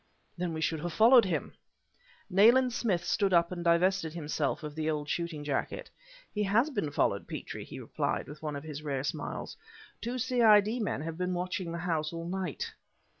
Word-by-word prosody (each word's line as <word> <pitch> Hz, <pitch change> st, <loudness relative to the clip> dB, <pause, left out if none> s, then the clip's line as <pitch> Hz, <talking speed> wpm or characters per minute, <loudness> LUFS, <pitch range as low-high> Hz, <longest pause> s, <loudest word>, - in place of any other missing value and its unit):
"Then 180 Hz, -1 st, -2 dB
we 160 Hz, -, -4 dB
should 160 Hz, 0 st, 0 dB
have 175 Hz, +2 st, -4 dB
followed 235 Hz, +1 st, +7 dB
him!" 170 Hz, -5 st, -2 dB, 0.7 s
Nayland 235 Hz, +6 st, +5 dB
Smith 190 Hz, -9 st, 0 dB
stood 195 Hz, +1 st, +1 dB
up 170 Hz, 0 st, +4 dB
and 175 Hz, -1 st, -4 dB
divested 170 Hz, 0 st, +2 dB
himself 155 Hz, -1 st, -2 dB
of 150 Hz, -1 st, -5 dB
the 155 Hz, 0 st, -2 dB
old 150 Hz, -1 st, -2 dB
shooting 170 Hz, -2 st, -3 dB
jacket. 145 Hz, -2 st, -3 dB, 0.4 s
"He 210 Hz, -, -1 dB
has 220 Hz, +9 st, +2 dB
been 205 Hz, -, -1 dB
followed, -, -, 0 dB
Petrie," -, -, -6 dB
he -, -, -9 dB
replied, -, -, -2 dB
with 150 Hz, +1 st, -10 dB
one 150 Hz, -2 st, -3 dB
of 140 Hz, -, -6 dB
his 150 Hz, -2 st, -6 dB
rare 140 Hz, -3 st, -2 dB
smiles. -, -, -4 dB, 0.5 s
"Two 240 Hz, +2 st, -3 dB
C.I.D. 230 Hz, -3 st, +4 dB
men 205 Hz, -, -1 dB
have 165 Hz, +1 st, -5 dB
been 180 Hz, 0 st, -1 dB
watching 180 Hz, 0 st, -3 dB
the 170 Hz, -, -4 dB
house 160 Hz, -3 st, -1 dB
all 165 Hz, 0 st, -5 dB
night!" 185 Hz, -4 st, -3 dB
175 Hz, 185 wpm, -30 LUFS, 155-205 Hz, 0.7 s, followed